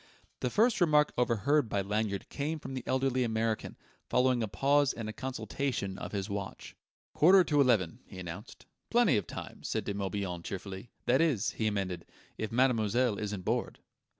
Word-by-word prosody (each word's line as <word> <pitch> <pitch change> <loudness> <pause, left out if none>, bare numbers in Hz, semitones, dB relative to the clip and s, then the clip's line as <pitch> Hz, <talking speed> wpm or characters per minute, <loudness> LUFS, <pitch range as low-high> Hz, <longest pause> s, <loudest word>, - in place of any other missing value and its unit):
The 125 - -1
first 225 - +3
remark 150 -3 +4
overheard 125 +3 +2
by 100 - 0
Lanyard 105 0 -2
came 150 +3 -2
from 135 -3 -8
the 130 - -3
elderly 130 -1 +1
American, 110 -1 -1 0.3
following 125 -1 +3
a 110 - 0
pause 140 +5 +2
and 115 -2 -5
a 110 - -4
consultation 120 -4 -3
of - - -6
his 100 -2 -2
watch. 100 -2 -6 0.4
"Quarter 185 +4 +7
to 145 -4 +3
eleven," 110 -11 +2
he - - -11
announced. 85 -2 -8 0.2
"Plenty - - +4
of - - -2
time," - - -8
said - - -2
De 100 - -2
Morbihan 95 -3 -3
cheerfully. 95 +4 -6 0.2
"That 130 +4 +4
is," 150 - +2
he 110 - -1
amended, 95 -5 -2 0.3
"if 110 - -3
mademoiselle 120 -2 +2
isn't 105 -3 -4
bored - - -1
115 Hz, 170 wpm, -31 LUFS, 100-135 Hz, 0.4 s, Quarter